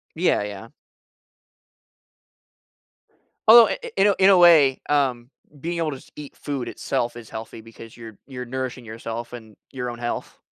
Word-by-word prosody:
Yeah, 165 - +1
yeah. 105 +2 -8 2.8
Although, 230 +1 +9
i - - -3
i 480 - -7
in 195 - +4
a 200 - +4
in 190 +1 +5
a 195 - +6
way, 155 -7 +6
um, 130 -4 0 0.3
being 170 +2 -4
able 155 -3 -1
to - - -5
s - - -17
eat 150 -2 -10
food 140 -4 -5
itself 120 0 -3
is 115 -2 -11
healthy 110 0 -8
because 115 0 -14
you're 110 -3 -11
you're 125 -2 -7
nourishing 130 0 -5
yourself 115 +1 -7
and 110 -3 -11 0.2
your 125 -2 -4
own 120 - -8
health. 120 0 -5
125 Hz, 165 wpm, -23 LUFS, 115-150 Hz, 2.8 s, Although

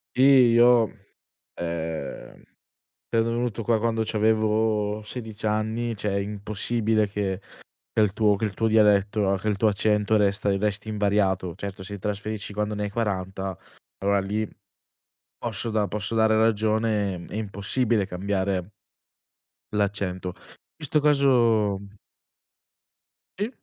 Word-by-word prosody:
Sì, 130 - +3
io, 120 -3 +6 0.7
ehm, 80 -4 -5 0.7
sono 115 -1 +2
venuto 120 -1 -2
qua 115 0 +2
quando 115 0 0
c'avevo 110 -1 +1
16 110 -1 -7
anni, 110 +2 -1
cioè 105 0 -2
è 100 - 0
impossibile 105 +2 -1
che 100 -2 -2 0.5
che 110 - +2
il 100 -2 +2
tuo 105 -2 +3
che 110 - -2
il 100 - -4
tuo 115 - 0
dialetto, 105 -2 +3
che 110 - -5
il 105 -2 +1
tuo 110 - +3
accento 105 +1 +2
resta 100 -1 +1
resti 105 +1 -2
invariato. 100 -4 +1
Certo, 100 -1 -7
se 100 +1 -7
trasferisci 105 +1 -4
quando 105 +1 -2
ne 105 - -3
hai - - -3
40, 95 -3 -3 0.4
allora 100 +1 +2
lì 105 +3 -2 0.9
posso 115 - -3
da 105 -2 +1
posso 105 +2 -3
dare 110 -1 +4
ragione, 110 -4 +1
è - - -9
impossibile 105 +1 0
cambiare 95 0 -2 1.0
l'accento. 100 -3 -1
In - - -22
questo 150 -1 0
caso... 120 -9 +3 1.6
Sì. 210 +3 0
105 Hz, 125 wpm, -25 LUFS, 100-110 Hz, 1.6 s, io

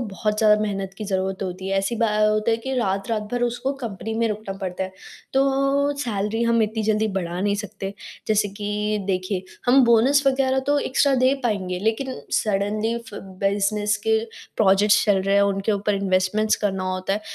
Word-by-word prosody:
बहुत 210 -1 -2
ज़्यादा 210 -1 +5
मेहनत 195 -2 -3
की 215 - -4
ज़रूरत 190 -1 -2
होती 185 +1 -5
है। 195 0 +1
ऐसी 225 +4 -1
बा 230 0 +2
अ, 215 0 +2
होता 215 +1 +1
है 225 - +2
कि 265 +3 -4
रात-रात 200 +1 -1
भर 245 0 -1
उसको 245 +3 -1
कंपनी 220 0 -4
में 230 - +2
रुकना 210 -2 -4
पड़ता 190 0 -3
है। 190 - -8 0.4
तो 275 +1 +2
सैलरी 225 -2 -2
हम 230 -1 +3
इतनी 220 +1 -1
जल्दी 215 0 +1
बढ़ा 175 0 -4
नहीं 205 0 +1
सकते, 195 -1 -7 0.3
जैसे 210 -1 +2
कि 210 +1 -2
देखिए, 185 0 -1 0.2
हम 260 +1 +6
बोनस 240 +5 +4
वग़ैरह 265 0 +2
तो 290 0 +3
एक्स्ट्रा 275 0 +2
दे 260 +2 +3
पाएँगे 190 -6 -1
लेकिन 225 +6 -2
सडनली 215 +2 0
फ - - -11 0.2
बिज़नेस 205 +1 +1
के 220 0 +4 0.4
प्रोजेक्ट्स 205 0 +4
चल 200 -3 +3
रहे 195 +1 +1
हैं 200 - +5
उनके 200 +1 0
ऊपर 205 0 0
इन्वेस्टमेंट्स 195 +2 +1
करना 190 -2 0
होता 185 +1 -2
है, 210 - -1
210 Hz, 185 wpm, -23 LUFS, 195-230 Hz, 0.4 s, हम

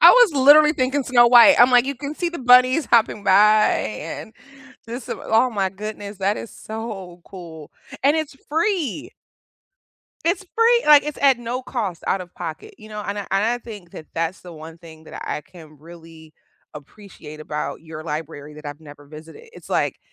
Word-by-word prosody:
I - - +10
was - - +5
literally 295 +2 +6
thinking 270 0 -1
Snow 245 -2 +4
White. 245 +4 +7
I'm 245 +1 +6
like, 245 0 +4
you 280 - -3
can 285 +3 -7
see 350 +1 -2
the 340 - -8
bunnies 255 +3 +4
hopping 220 -3 +1
by 210 +3 +4
and 150 - -5 0.6
just 240 +1 -7
oh, 225 +3 0
my 200 -4 -1
goodness, 205 0 -8
that 200 +2 0
is 230 - -8
so 205 -6 -8
cool, 165 -5 -12 0.3
and 285 +2 +4
it's 310 -3 -4
free! 320 - -2 1.1
It's 350 +3 -1
free 470 +1 +3
like, 295 -1 +7
it's 300 0 -6
at 270 -3 +4
no 240 +2 -5
cost 210 -10 -5
out 195 - 0
of 180 -1 -11
pocket, 165 -3 -8
you 215 - -14
know? 210 -1 -7
And 205 0 -5
I 205 - -6
and 195 +1 +1
I 240 +2 0
think 210 -7 -12
that 155 - -11
that's 165 +3 -3
the 180 - -12
one 160 0 -11
thing 160 -2 -15
that - - -10
I - - -3
can 155 -1 -17
really 165 0 -15 0.4
appreciate 155 0 -13
about 150 0 -5
your 160 -1 -10
library 150 -1 -7
that 150 0 -11
I've 145 +1 -8
never 145 -2 -15
visited. 160 - -14
It's - - -15
like, - - -1
210 Hz, 190 wpm, -21 LUFS, 165-255 Hz, 1.1 s, I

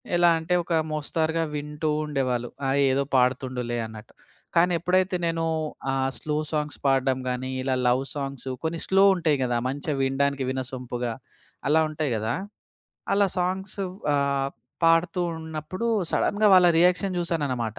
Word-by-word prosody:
ఎలా 175 0 +5
అంటే 160 +2 -2
ఒక 170 - -3 0.2
మోస్తరుగా 160 +2 -1
వింటూ 150 +1 -3 0.2
ఉండేవాళ్ళు. 130 -5 -1 0.2
ఆ - - +1 0.2
ఏదో 135 +1 +2
పాడుతుండులే 125 -1 +1
అన్నట్టు. 110 -1 -11 0.4
కానీ 175 +2 +4
ఎప్పుడైతే 185 +2 +1
నేను 165 0 0 0.5
ఆహ్, 135 0 0
స్లో 150 -1 -2
సాంగ్స్ 150 -1 -2
పాడ్డం 135 -1 +2
గాని, 125 +1 -3
ఇలా 130 0 0
లవ్ 125 +2 +3
సాంగ్సు 135 -2 -4
కొన్ని 165 +1 -2
స్లో 195 +1 +5
ఉంటాయి 160 -5 +1
కదా! 120 -1 0
మంచిగా 145 +3 -2
వినడానికి 135 +1 +1
వినసొంపుగా. 125 -2 -4 0.5
అలా 155 +2 +4
ఉంటాయి 155 -3 -2
కదా! 110 +2 -1 0.8
అలా 200 0 +4
సాంగ్సు 190 +2 -2 0.3
ఆహ్, 140 -1 +1 0.3
పాడుతూ 165 +2 +3 0.2
ఉన్నప్పుడు 160 +6 -5 0.2
సడెన్‌గా 210 +1 +2
వాళ్ళ 180 -1 +7
రియాక్షన్ 180 +2 +3
జూసాననమాట. 140 -10 -2
145 Hz, 135 wpm, -25 LUFS, 130-165 Hz, 0.8 s, వాళ్ళ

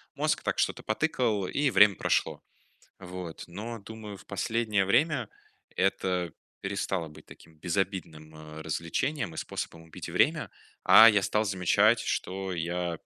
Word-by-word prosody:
мозг, - - 0
так - - -1
что-то - - 0
потыкал, 110 - 0
и 145 +6 +1
время 105 -5 +6
прошло. - - 0 0.6
Вот, 90 -3 -8
но, 110 +6 -7
думаю, 105 0 -9
в - - -17
последнее 105 0 0
время 125 - +2 0.5
это 90 -3 0 0.3
перестало 95 -3 -2
быть 75 - -15
таким 80 -1 -16
безобидным, 85 -3 -3
э, 80 0 -10
развлечением 85 - -2
и - - -10
способом 80 +1 -5
убить 80 - -9
время, - - +2 0.3
а, 110 +1 +9
я 105 -3 +4
стал 105 +2 +1
замечать, 105 +3 +3
что 95 0 -3
я 85 0 -2
95 Hz, 135 wpm, -28 LUFS, 85-110 Hz, 0.6 s, а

